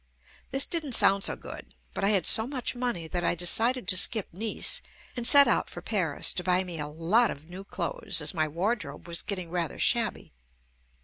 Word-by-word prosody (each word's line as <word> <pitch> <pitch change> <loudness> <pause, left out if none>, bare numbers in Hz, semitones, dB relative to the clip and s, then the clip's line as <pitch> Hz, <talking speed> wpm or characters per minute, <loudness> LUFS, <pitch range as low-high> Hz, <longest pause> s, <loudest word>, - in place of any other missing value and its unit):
This 270 0 +3
didn't 315 -6 -2
sound 195 0 +5
so - - +3
good, - - -12 0.2
but - - -6
I 200 - +2
had 195 -6 +1
so 220 +1 +5
much 260 -2 -1
money 240 -10 -4
that 175 +2 -4
I - - -1
decided 225 +7 0
to 195 - +2
skip 200 +2 +2
Nice 215 +5 0 0.3
and 240 -1 +1
set 280 0 +7
out 235 - 0
for - - -10
Paris 180 -9 0
to 180 - -5
buy 185 0 0
me 175 -3 -8
a 150 - -4
lot 170 +10 0
of 155 +5 -10
new 190 +2 -10
clothes, - - -4
as - - -1
my 155 -3 -2
wardrobe 185 +5 -5
was 170 -1 -1
getting 185 -5 -6
rather 175 -2 -4
shabby. 230 - +1
195 Hz, 200 wpm, -26 LUFS, 175-235 Hz, 0.3 s, set